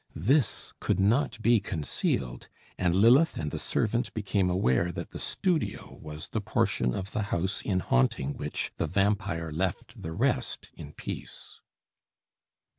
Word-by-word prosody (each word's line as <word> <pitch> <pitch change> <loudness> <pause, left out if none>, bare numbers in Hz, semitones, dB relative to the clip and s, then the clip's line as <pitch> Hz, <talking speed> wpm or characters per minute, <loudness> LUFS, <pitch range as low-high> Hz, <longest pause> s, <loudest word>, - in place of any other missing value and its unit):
This 125 - +1
could - - 0
not 110 +5 +2
be 120 -1 +5
concealed; 75 -9 -2 0.3
and 90 -1 +1
Lilith 125 - +5
and 75 -2 -2
the - - -3
servant 115 +2 0
became 100 -3 +1
aware 85 -2 +2
that - - -6
the - - -7
studio 180 -5 -1
was 75 0 -7
the - - -2
portion 60 -1 +1
of 95 0 -4
the 105 - -1
house 95 +4 -1
in 95 -3 0
haunting 65 +1 +1
which 75 0 -3
the 80 - 0
vampire 95 -3 0
left 90 +4 -3
the 80 - -5
rest - - -1
in 75 - -10
peace. - - -8
95 Hz, 145 wpm, -29 LUFS, 75-105 Hz, 0.3 s, be